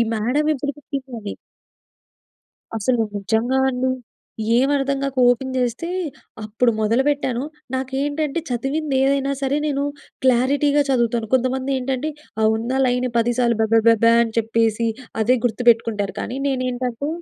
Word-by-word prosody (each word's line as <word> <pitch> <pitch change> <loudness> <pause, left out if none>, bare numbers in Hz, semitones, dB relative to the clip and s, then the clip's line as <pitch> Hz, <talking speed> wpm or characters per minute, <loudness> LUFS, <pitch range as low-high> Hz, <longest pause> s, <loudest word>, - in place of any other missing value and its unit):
Madam 250 +8 0
ఎప్పుడు 285 +1 -3
చెప్పిందని. 260 -7 -6 1.4
అసలు 235 +3 +1 0.2
నిజంగా 225 +6 0
అండి. 260 0 0 0.7
ఏమర్థం 275 0 +1
గాక 275 -1 -3
ఓపెన్ 260 +2 -1
జేస్తే. 250 +6 -1 0.6
అప్పుడు 230 +3 +1
మొదలుపెట్టాను, 255 +2 +1 0.3
నాకు 260 0 -3
ఏంటంటే 295 +2 -1
చదివిందేదైనా 275 +1 0
సరే 275 +2 +1
నేనూ 280 -1 0 0.4
క్లారిటీగా 280 +4 +3
చదువుతాను. 235 -3 +1
కొంతమంది 260 +1 0
ఏంటంటే 265 +4 -2 0.3
ఆ - - +4
ఉన్న 235 +3 -3
లైన్ 250 0 +1
పదిసార్లు 235 0 +1
బెబెబెబా 225 +1 +4
అని 225 -1 -3
చెప్పేసి 225 0 +1 0.3
అదే 250 +4 +3
గుర్తుపెట్టుకుంటారు. 230 -3 +2
కానీ 255 +3 -4
నేనేంటంటే 255 0 -2
255 Hz, 110 wpm, -21 LUFS, 230-275 Hz, 1.4 s, ఆ